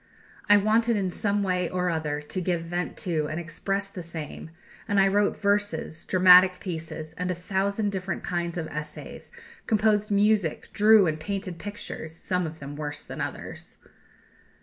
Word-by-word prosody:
I 205 - +8
wanted 220 +2 +3
in 190 -3 -1
some 205 +2 0
way 180 -2 0
or 180 -1 0
other 150 -2 -2
to 185 +5 -4
give 175 -2 -1
vent 175 +1 -3
to 160 -4 0
and 155 +2 -3
express 195 +4 -3
the 195 -2 -8
same; 160 -2 -7 0.4
and 205 -1 +2
I 195 - +5
wrote 205 +1 +2
verses, 200 -6 -1
dramatic 185 0 +7
pieces, 160 -3 -6
and 180 0 -1
a 180 - 0
thousand 200 +3 -1
different 190 -2 -4
kinds 175 -1 -2
of 165 - -2
essays; 150 0 -8 0.4
composed 210 -1 +2
music, 205 -4 +2
drew 215 -1 +6
and 155 -2 -1
painted 190 0 -4
pictures, 185 -5 -7
some 180 0 -1
of 160 0 -8
them 140 -1 -8
worse 145 -1 -5
than - - -7
others." - - -7
180 Hz, 165 wpm, -26 LUFS, 165-200 Hz, 0.4 s, I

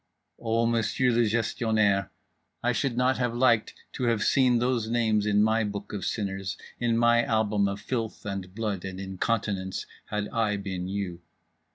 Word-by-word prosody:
O 115 0 +1
Monsieur 115 +2 +2
le 120 -1 +3
Gestionnaire, 110 -3 +1 0.5
I 120 - +3
should 125 0 -1
not 125 +1 +2
have 120 -2 0
liked 120 -3 +3 0.2
to 125 - -2
have 115 -3 +2
seen 130 -3 +4
those 120 -2 0
names 110 -3 +2
in 105 0 +4
my 110 +1 +2
book 105 0 -5
of 100 -3 -3
sinners, 95 -3 -3 0.2
in 120 -1 +1
my 120 0 +4
album 105 -3 +1
of 100 0 -3
filth 115 0 -4
and 95 -2 -5
blood 105 -5 -2
and 95 -1 -6
incontinence, 95 0 -2 0.2
had 105 0 -2
I 110 -3 0
been 95 -2 -4
you…. 95 -3 -4
110 Hz, 165 wpm, -27 LUFS, 100-120 Hz, 0.5 s, seen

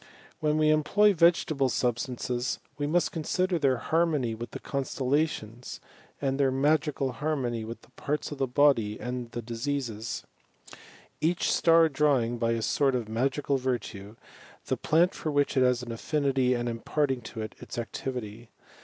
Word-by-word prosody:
When 150 0 +1
we 155 0 +4
employ 200 +7 +4
vegetable 160 -5 +3
substances, 125 0 -1 0.2
we 145 0 -2
nrast 175 +3 +1
consider 180 +2 0
th«r 135 -3 +2
harmony 150 -4 +1
with 115 +2 -6
the - - -7
constellations, 135 -3 -2 0.4
and 135 -1 -1
their 135 -1 +4
magical 140 0 +1
harmony 130 -5 -2
with 115 +2 -8
the - - -21
parts 150 +1 -3
of 145 - -6
the 135 - +1
body 125 -6 +3
and 125 -1 -4
the 120 0 -6
dis^ises, 120 -1 -3 1.0
each 170 +3 +1
star 165 -1 +5
drawing, 135 -5 +1
by 115 0 +1
a 115 -1 -2
sort 135 +2 +2
of 120 -3 -2
magical 135 +5 0
virtue, 115 -5 -4 0.5
the - - 0
plant 170 +4 +2
for 155 - -4
which 145 -1 +1
it 130 - +4
has 125 -1 +3
an 120 - -6
affinity, 135 0 +1
and 120 0 -2
imparting 130 +3 -1
to 110 0 -7
it 110 - -7
Its - - -8
activitv. 120 -1 -5
135 Hz, 155 wpm, -28 LUFS, 120-150 Hz, 1.0 s, star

